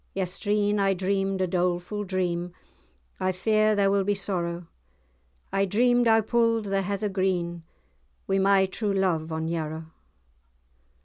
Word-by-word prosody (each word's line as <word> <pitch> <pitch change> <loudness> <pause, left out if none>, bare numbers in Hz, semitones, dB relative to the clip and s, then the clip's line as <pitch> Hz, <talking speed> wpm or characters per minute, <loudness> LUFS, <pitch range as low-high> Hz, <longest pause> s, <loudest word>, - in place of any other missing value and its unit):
"Yestreen 205 +2 0
I 195 -1 +2
dreamed 195 +1 -1
a 185 - +1
dolefu' 180 +3 -1
dream, 180 -2 -2 0.7
I 185 - +1
fear 215 +3 +2
there 200 -1 +3
will 200 -1 +2
be 205 +1 0
sorrow! 175 -3 -3 0.9
I 195 0 +2
dreamed 245 +4 +3
I 225 0 +5
pu'd 230 0 +1
the 195 0 0
heather 200 +2 -2
green, 185 -3 -1 0.7
Wi' 195 0 +1
my 195 0 +4
true 200 +2 -2
love 170 -5 0
on 160 0 -2
Yarrow. 160 -1 -4
195 Hz, 135 wpm, -26 LUFS, 180-205 Hz, 0.9 s, I